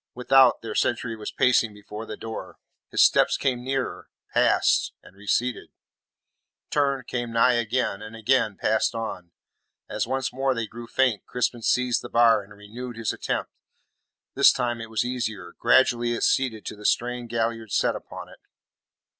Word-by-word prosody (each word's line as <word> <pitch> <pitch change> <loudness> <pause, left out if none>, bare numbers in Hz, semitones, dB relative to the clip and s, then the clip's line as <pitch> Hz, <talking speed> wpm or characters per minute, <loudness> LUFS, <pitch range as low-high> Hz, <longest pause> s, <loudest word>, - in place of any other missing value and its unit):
Without, 125 0 +4
their 110 -2 -5
sentry 115 0 0
was 105 -1 -6
pacing 115 -4 +2
before 105 +2 -9
the 105 - -7
door; 110 0 -7 0.3
his - - +4
steps - - +4
came 125 -2 -1
nearer, 135 0 -3 0.2
passed, - - +3
and - - -17
receded; 115 +4 -1 1.0
turned, 140 -3 +1
came 120 -1 -4
nigh 115 +2 +4
again, 120 -3 -1
and 110 +1 -9
again 110 -2 +1
passed 110 +1 +1
on. 90 -6 -5 0.6
As - - -2
once 135 -1 -2
more 135 0 0
they 115 -1 -2
grew 115 +2 -10
faint, 125 -4 0
Crispin 120 -1 -1
seized 125 +1 +1
the - - -9
bar 115 -2 +4
and 100 +1 -17
renewed 110 +4 -9
his 115 -2 -2
attempt. - - -3 0.8
This - - +6
time 120 -2 -2
it 115 - -8
was 110 +2 -1
easier. 110 -8 -4
Gradually 120 -2 +3
it 115 - -3
ceded 120 -5 +1
to - - -5
the 105 - -13
strain 125 0 -1
Galliard 115 -2 -2
set - - +1
upon - - -9
it. - - -16
115 Hz, 165 wpm, -25 LUFS, 110-125 Hz, 1.0 s, This